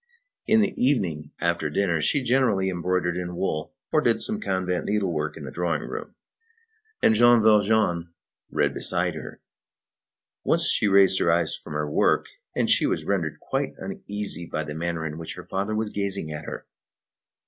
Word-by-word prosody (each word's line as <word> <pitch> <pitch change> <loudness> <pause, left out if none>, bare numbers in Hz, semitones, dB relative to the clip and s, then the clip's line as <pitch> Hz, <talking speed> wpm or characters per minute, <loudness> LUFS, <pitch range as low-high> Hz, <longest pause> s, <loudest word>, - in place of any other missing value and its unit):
In 220 0 +5
the 205 - +1
evening, 90 - +1
after 85 -3 0
dinner, 85 0 +1
she 140 - +2
generally 115 -7 +2
embroidered 90 0 -1
in 90 -1 -4
wool 85 +3 -3 0.2
or 155 - +3
did 120 -5 +2
some 215 0 -1
convent 95 - -1
needlework 90 -8 -1
in 75 - -8
the 65 - -7
drawing 85 +2 -1
room, - - -7 0.9
and - - +6
Jean 120 +2 +6
Valjean 105 -5 +3 0.4
read - - +1
beside - - +1
her. - - -9 1.0
Once - - +3
she 110 - +2
raised 95 -1 +5
her 85 - +3
eyes 85 -1 +1
from - - -9
her 75 0 -1
work, 75 - +2 0.3
and - - +1 0.2
was - - -2
rendered 85 -7 -1
quite - - -2
uneasy 100 -5 -5
by 80 - -3
the 75 -1 -6
manner 85 0 -3
in 80 0 -5
which 85 +2 -5
her 90 - -9
father 100 +4 -2
was 110 -1 -1
gazing 100 -5 -2
at 75 0 -6
her. - - -7
90 Hz, 170 wpm, -25 LUFS, 85-105 Hz, 1.0 s, and